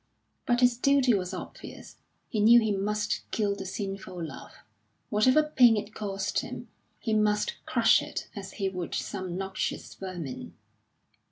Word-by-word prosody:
But 245 0 +2
his 245 -1 +4
duty 270 -1 +4
was 185 -3 -1
obvious; 185 - -9 0.3
he 220 - -2
knew 230 +3 +8
he 220 -2 0
must 210 +2 -1
kill 205 -2 0
the 195 -1 -6
sinful 190 -3 -5
love, - - -9 0.6
whatever 255 +8 +4
pain 250 -7 +5
it 210 +1 -4
cost 195 -2 -2
him; - - -7 0.3
he 225 - -2
must 210 -1 +1
crush - - +4
it - - -5
as 195 -2 -7
he 195 - -1
would 180 -2 -4
some 185 -3 -4
noxious 190 0 -3
vermin. 175 -8 -7
205 Hz, 150 wpm, -28 LUFS, 190-225 Hz, 0.6 s, knew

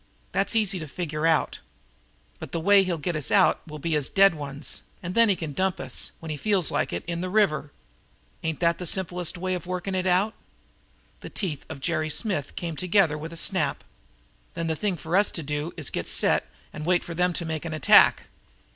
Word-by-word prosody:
That's 200 - 0
easy 205 -4 +1
to 155 - -6
figure 155 0 -2
out. 160 -2 +1 0.8
But - - -9
the 165 - 0
way 200 +4 +6
he'll 180 -3 -1
get 165 +3 -3
us 150 -3 +1
out 195 -2 +4
will 155 -1 -7
be 160 +2 -1
as 145 -3 +1
dead 195 -1 +5
ones, 145 -1 -4 0.2
and 175 +1 -4
then 230 0 +5
he 200 - +3
can 160 -4 -5
dump 190 +3 0
us, 130 -2 -1
when 160 -1 -6
he 150 - -3
feels 195 -1 +1
like - - 0
it, 85 - -4
in 170 0 -3
the 185 - -3
river. 155 -8 +1 0.7
Ain't 160 0 -3
that 170 -1 +2
the 180 - -4
simplest 180 -1 -1
way 185 +1 -2
of 180 -1 -4
working 185 +1 -3
it 185 0 0
out?" 190 +5 +2 0.9
The - - -9
teeth 160 -9 -4
of 135 - -8
Jerry 155 +1 -1
Smith 155 - -1
came 170 -2 -4
together 180 -1 +2
with 155 +2 -6
a 170 - -8
snap. - - -1 0.7
"Then 165 - -2
the 160 -1 0
thing 185 +3 -1
for 160 +3 -3
us 205 +1 +4
to 165 - -5
do 150 +3 -3
is 155 - -6
to - - -3
get - - -3
set - - +3 0.3
and 150 - -6
wait 175 +2 +2
for 170 - -6
them 180 +1 +1
to 170 - -3
make 160 -1 -3
an 165 -2 -4
attack?" 155 - +6
170 Hz, 220 wpm, -26 LUFS, 155-185 Hz, 0.9 s, way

